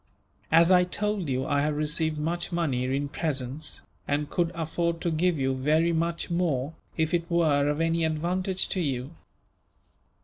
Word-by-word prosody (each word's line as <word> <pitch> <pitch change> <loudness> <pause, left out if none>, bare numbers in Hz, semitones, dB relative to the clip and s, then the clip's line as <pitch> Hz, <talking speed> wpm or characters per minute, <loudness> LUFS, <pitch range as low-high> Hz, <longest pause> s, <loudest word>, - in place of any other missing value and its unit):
As 165 +3 +6
I 180 -1 +6
told 200 -1 -1
you, 130 0 0
I 145 0 +1
have 150 +1 0
received 155 +1 +1
much 170 +4 -2
money 145 -8 0
in 135 +2 -1
presents, 145 -1 -3 0.2
and 145 +1 -1
could 170 -1 +1
afford 170 +1 -1
to 170 - 0
give 170 +1 +1
you 135 -1 +1
very 155 +6 +2
much 170 +2 -1
more, 160 -5 0 0.2
if 160 0 0
it 170 -1 0
were 150 -4 +3
of 150 +1 -1
any 165 0 +1
advantage 180 +4 -1
to 185 - -1
you. 135 -3 -2
160 Hz, 165 wpm, -27 LUFS, 145-170 Hz, 0.2 s, As